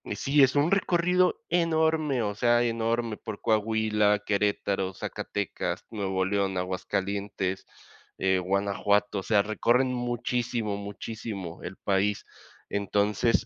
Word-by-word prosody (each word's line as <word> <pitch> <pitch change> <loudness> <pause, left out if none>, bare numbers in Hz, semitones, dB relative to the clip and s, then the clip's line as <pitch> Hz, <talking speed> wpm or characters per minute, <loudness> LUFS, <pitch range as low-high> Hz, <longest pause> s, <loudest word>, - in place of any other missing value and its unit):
Sí, 140 +5 +3
es 130 0 +3
un 145 +3 +3
recorrido 180 -1 +2
enorme, 160 -5 +2
o 105 -2 -2
sea, 120 +2 +3
enorme 115 -1 0
por 110 -2 -7
Coahuila, 110 -1 +2
Querétaro, 100 -2 0
Zacatecas, 100 +1 -4
Nuevo 95 -3 -1
León, 100 -1 0
Aguascalientes, 95 +1 -2 0.5
eh, 95 0 +2
Guanajuato, 100 +2 +1
o - - -6
sea, 105 0 +3
recorren 120 +5 +2
muchísimo, 120 -3 -2
muchísimo 100 -3 -6
el 95 - -7
país, 100 +1 0 0.5
entonces, 105 +3 +1
105 Hz, 110 wpm, -27 LUFS, 100-120 Hz, 0.5 s, Sí